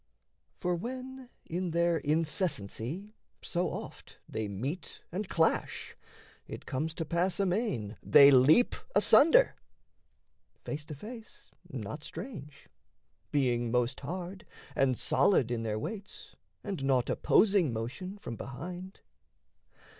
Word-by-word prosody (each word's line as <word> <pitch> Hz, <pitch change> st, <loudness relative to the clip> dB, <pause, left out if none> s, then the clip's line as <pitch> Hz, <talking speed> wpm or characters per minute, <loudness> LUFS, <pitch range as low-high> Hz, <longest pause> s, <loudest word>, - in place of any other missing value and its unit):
For, 180 Hz, 0 st, 0 dB
when, 255 Hz, +6 st, -6 dB, 0.2 s
in 180 Hz, +2 st, -2 dB
their 170 Hz, 0 st, +2 dB
incessancy 155 Hz, -, -1 dB, 0.3 s
so 175 Hz, +1 st, -1 dB
oft -, -, -8 dB
They 110 Hz, -1 st, -3 dB
meet 130 Hz, -, -5 dB
and 190 Hz, +3 st, -4 dB
clash, 160 Hz, -1 st, 0 dB, 0.5 s
it -, -, -8 dB
comes 155 Hz, +5 st, -2 dB
to 165 Hz, -, -3 dB
pass 175 Hz, +4 st, 0 dB
amain 180 Hz, -, -1 dB
They 140 Hz, 0 st, +8 dB
leap 140 Hz, -, +6 dB, 0.2 s
asunder, 485 Hz, -, +6 dB, 1.1 s
face 145 Hz, 0 st, -5 dB
to 150 Hz, -, -7 dB
face: 225 Hz, -, -11 dB, 0.2 s
not -, -, -6 dB
strange 150 Hz, -, -8 dB, 0.6 s
Being 120 Hz, -4 st, +1 dB
most 125 Hz, +2 st, 0 dB
hard, 180 Hz, +5 st, -6 dB, 0.3 s
and 130 Hz, -3 st, +2 dB
solid 130 Hz, -, +3 dB
in 120 Hz, -2 st, -1 dB
their 110 Hz, -1 st, -2 dB
weights, 205 Hz, -, -7 dB, 0.3 s
And 195 Hz, -9 st, -4 dB
naught 130 Hz, -3 st, +2 dB
opposing 195 Hz, -, +3 dB
motion, 130 Hz, -, -5 dB
from 120 Hz, -, -7 dB
behind. 175 Hz, -, -8 dB
165 Hz, 115 wpm, -31 LUFS, 130-190 Hz, 1.1 s, They